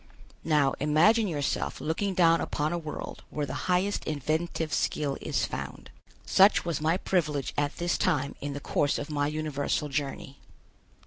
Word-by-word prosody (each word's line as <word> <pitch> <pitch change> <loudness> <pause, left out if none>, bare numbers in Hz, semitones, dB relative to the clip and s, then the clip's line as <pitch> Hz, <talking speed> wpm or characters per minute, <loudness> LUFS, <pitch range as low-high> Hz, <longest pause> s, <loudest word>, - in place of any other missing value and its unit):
Now 150 -4 +3
imagine 175 +10 +4
yourself 145 -6 -2
looking 185 +5 -1
down 165 -2 +5
upon 150 +2 -1
a - - 0
world 155 -2 -7
where 150 -1 -2
the - - -6 0.2
highest 185 +3 +1
inventive 155 +2 -2
skill 145 -2 0
is - - 0
found. - - -7 0.3
Such 195 0 +5
was 165 -4 -2
my 160 +3 +2
privilege 155 -8 -1
at 145 0 -1
this 175 0 0
time 145 -8 +1
in 145 0 -3
the 140 - -4
course 145 0 0
of 145 +1 -5
my 145 -1 +1
universal 150 -1 -2
journey. 140 -1 -4
155 Hz, 155 wpm, -28 LUFS, 145-175 Hz, 0.3 s, down